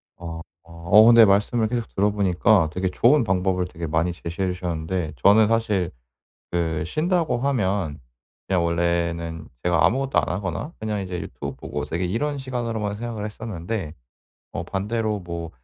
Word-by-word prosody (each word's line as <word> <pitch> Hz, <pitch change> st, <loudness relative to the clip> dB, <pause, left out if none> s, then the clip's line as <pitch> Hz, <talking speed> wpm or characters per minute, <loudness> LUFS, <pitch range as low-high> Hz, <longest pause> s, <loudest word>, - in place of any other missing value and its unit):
어 85 Hz, -1 st, -7 dB, 0.3 s
어. 85 Hz, -, -18 dB, 0.2 s
어 105 Hz, +3 st, +9 dB
근데 115 Hz, -1 st, +8 dB
말씀을 105 Hz, +3 st, +2 dB
계속 120 Hz, 0 st, -2 dB
들어 100 Hz, +2 st, +3 dB
보니까 95 Hz, -2 st, +3 dB
되게 95 Hz, +1 st, -1 dB
좋은 120 Hz, +9 st, +4 dB
방법을 95 Hz, -2 st, +1 dB
되게 85 Hz, -2 st, -6 dB
많이 80 Hz, +3 st, 0 dB
제시해 85 Hz, +2 st, -3 dB
주셨는데 85 Hz, -2 st, -3 dB
저는 105 Hz, -, +5 dB
사실 105 Hz, -5 st, +1 dB, 0.6 s
그 80 Hz, -3 st, -1 dB
쉰다고 155 Hz, -, 0 dB
하면 100 Hz, -, -1 dB, 0.5 s
그냥 90 Hz, -3 st, +1 dB
원래는 85 Hz, -1 st, -1 dB
제가 85 Hz, -3 st, +2 dB
아무것도 135 Hz, +2 st, +2 dB
안 -, -, -4 dB
하거나 100 Hz, -, -3 dB
그냥 105 Hz, -1 st, -2 dB
이제 90 Hz, -2 st, -4 dB
유튜브 -, -, -6 dB
보고 75 Hz, 0 st, -5 dB
되게 85 Hz, +4 st, -3 dB
이런 140 Hz, +11 st, -1 dB
시간으로만 115 Hz, -6 st, -3 dB
생각을 115 Hz, -2 st, -5 dB
했었는데 105 Hz, -5 st, -5 dB, 0.6 s
어 85 Hz, -, -3 dB
반대로 105 Hz, +3 st, -2 dB
뭐 85 Hz, -2 st, -6 dB
95 Hz, 340 characters per minute, -23 LUFS, 85-110 Hz, 0.6 s, 어